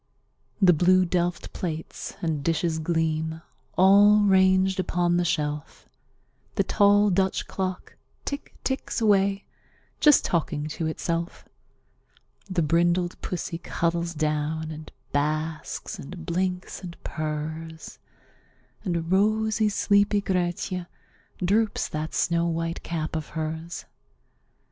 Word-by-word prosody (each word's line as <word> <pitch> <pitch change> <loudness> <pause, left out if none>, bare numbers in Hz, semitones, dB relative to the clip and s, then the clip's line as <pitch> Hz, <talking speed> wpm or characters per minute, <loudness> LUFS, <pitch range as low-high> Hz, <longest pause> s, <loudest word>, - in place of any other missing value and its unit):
The 185 -3 +6
blue 185 +3 +4
delft 175 0 -1
plates 160 -3 -5
and 155 -4 -1
dishes 165 0 0
gleam, 160 0 -1 0.3
all 205 +3 +7
ranged 190 -1 +4
upon 175 -1 +1
the 175 - +2
shelf; 150 -3 -2 0.7
The - - +3
tall 205 0 +4
Dutch 190 +1 +1
clock 185 -1 -4 0.3
tick 285 - -5
ticks 265 -1 -2
away, 200 -2 +2 0.5
just 295 -2 +6
talking 155 -3 -1
to 160 +1 -3
itself; 170 +2 -3 1.0
The 180 -3 +1
brindled 175 +3 +1
pussy 175 -1 -4
cuddles 170 -1 -1
down, 155 +1 -1
and 155 0 -9 0.2
basks 155 +2 -2
and 170 +4 -8
blinks 180 +2 -2
and 175 -3 -8
purrs; 155 +1 -5 0.8
And 170 -3 -2
rosy, 215 +2 +2
sleepy 205 0 +3
Grietje 180 -1 -2 0.6
droops 210 +3 +1
that 155 +1 -4
snow 170 0 +2
white 165 0 -2
cap 160 -2 -3
of 155 -1 -3
hers. 160 +2 -4
170 Hz, 110 wpm, -26 LUFS, 160-190 Hz, 1.0 s, all